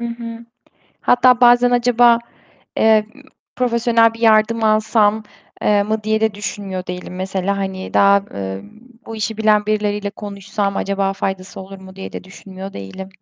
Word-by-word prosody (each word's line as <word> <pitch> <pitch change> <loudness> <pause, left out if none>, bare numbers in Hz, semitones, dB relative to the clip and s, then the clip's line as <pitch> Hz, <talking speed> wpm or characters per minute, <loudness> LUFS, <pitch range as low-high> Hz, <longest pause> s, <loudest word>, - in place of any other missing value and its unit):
Hı 235 - -3
hı. 235 0 -8 0.6
Hatta 250 0 +4
bazen 245 0 +5
acaba, 240 -1 +4 0.6
eee, 220 -1 +4
ııı, 280 - -16 0.3
profesyonel 235 -2 +2
bir 230 - -12
yardım 225 0 +3
alsam, 215 0 +2 0.4
eee, 205 -1 +3
mı 215 +1 -2
diye 220 0 0
de 220 -1 +1
düşünmüyor 195 -2 -5
değilim 180 0 -7
mesela, 190 +1 -2
hani, 190 -1 -5
daha, 200 0 +5
emm, 100 - -7 0.4
bu 225 - -7
işi 215 0 -3
bilen 215 -1 +2
birileriyle 210 -1 -1
konuşsam 200 -1 -4
acaba 195 0 -1
faydası 190 -1 -5
olur 195 +1 -10
mu 190 0 -13
diye 190 - -8
de - - -7
düşünmüyor 190 +1 -10
değilim. 100 - -8
210 Hz, 155 wpm, -18 LUFS, 195-225 Hz, 0.6 s, bazen